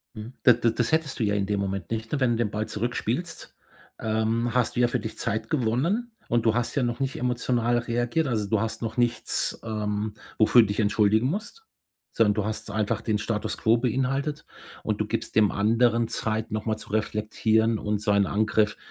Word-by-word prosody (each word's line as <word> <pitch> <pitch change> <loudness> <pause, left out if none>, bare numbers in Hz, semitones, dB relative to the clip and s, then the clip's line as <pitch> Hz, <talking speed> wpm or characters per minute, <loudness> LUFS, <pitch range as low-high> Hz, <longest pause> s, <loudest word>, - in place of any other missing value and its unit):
Mhm. 110 +4 -8
Da 125 - +8
da 120 -1 +1
das 120 +5 -1
hättest 160 -6 0
du - - +2
ja 105 0 +1
in 100 -1 0
dem 100 -1 0
Moment, 100 +1 -3
nicht 110 0 -3
nur 145 - 0
wenn 125 -2 +3
du - - 0
den 115 -3 0
Ball 105 +1 -2
zurückspielst, 120 +9 -3 0.5
ähm, 110 +2 0
hast 125 -1 +1
du - - +2
ja 120 - +4
für - - -1
dich 110 - -7
Zeit 110 +2 -2
gewonnen, 155 - 0 0.2
und 120 -1 +1
du 110 - +4
hast 120 +4 -1
ja 130 - +2
noch 120 +2 -2
nicht 135 -1 -1
emotional 120 -1 +1
reagiert. 120 +6 0
Also 105 -4 -1
du 110 -2 +1
hast 110 +1 -3
noch 115 +1 -3
nichts, 120 -1 0
ähm, 105 -1 -2 0.2
wofür 110 +2 +6
du 110 - +3
dich 100 - -3
entschuldigen 110 +2 +3
musst. 215 - -4 0.5
Sondern 105 -3 +3
du 105 - -1
hast 110 +1 -4
einfach 110 0 -1
den 110 -2 0
Status 110 0 -2
quo 115 +1 +3
beinhaltet, 135 +5 -1 0.4
und - - -2
du - - +1
gibst - - -4
dem 105 -2 +5
anderen 115 +2 +2
Zeit, 110 -1 -2
nochmal 110 +1 -1
zu - - -12
reflektieren 110 +1 +1
und 105 -1 -2
so 105 - 0
einen 100 -1 +4
Angriff 105 0 +1
115 Hz, 205 wpm, -26 LUFS, 105-120 Hz, 0.5 s, Da